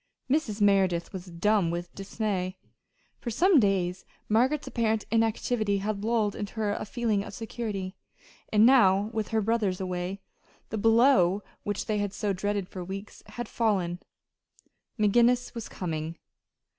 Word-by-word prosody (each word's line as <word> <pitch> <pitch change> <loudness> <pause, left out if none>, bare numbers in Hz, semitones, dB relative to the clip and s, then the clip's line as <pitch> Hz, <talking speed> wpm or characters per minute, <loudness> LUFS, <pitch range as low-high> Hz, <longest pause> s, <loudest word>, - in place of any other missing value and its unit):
Mrs. 255 -7 0
Merideth 190 -4 +2
was 185 -1 -7
dumb 180 +1 +1
with 175 +1 -4
dismay. 195 -2 -3 0.6
For 240 - -4
some 340 - +4
days 185 -4 +1 0.2
Margaret's 255 +7 +2
apparent 220 -2 0
inactivity 225 -2 +1
had 200 +1 -3
lulled 220 -2 +1
her - - -9 0.3
into - - -3
a - - -3
feeling 215 -2 0
of 200 - -9
security. 210 -4 -4 0.6
And 215 +1 +6
now, 210 -5 +5
with 220 -2 -1
her 220 -1 0
brothers 210 -4 0
away, 185 +1 -3 0.5
the 220 - -3
blow 225 -4 +4 0.2
which 205 -1 -3
they 215 -1 0
had 205 -1 -2
so 205 -2 -1
dreaded 200 0 -2
for 185 -1 -7
weeks 195 +3 -8
had 240 -1 -6
fallen 190 -7 0 1.0
McGinnis 240 +4 +3
was 230 -3 -6
coming. 165 -2 -4
205 Hz, 145 wpm, -28 LUFS, 190-225 Hz, 1.0 s, And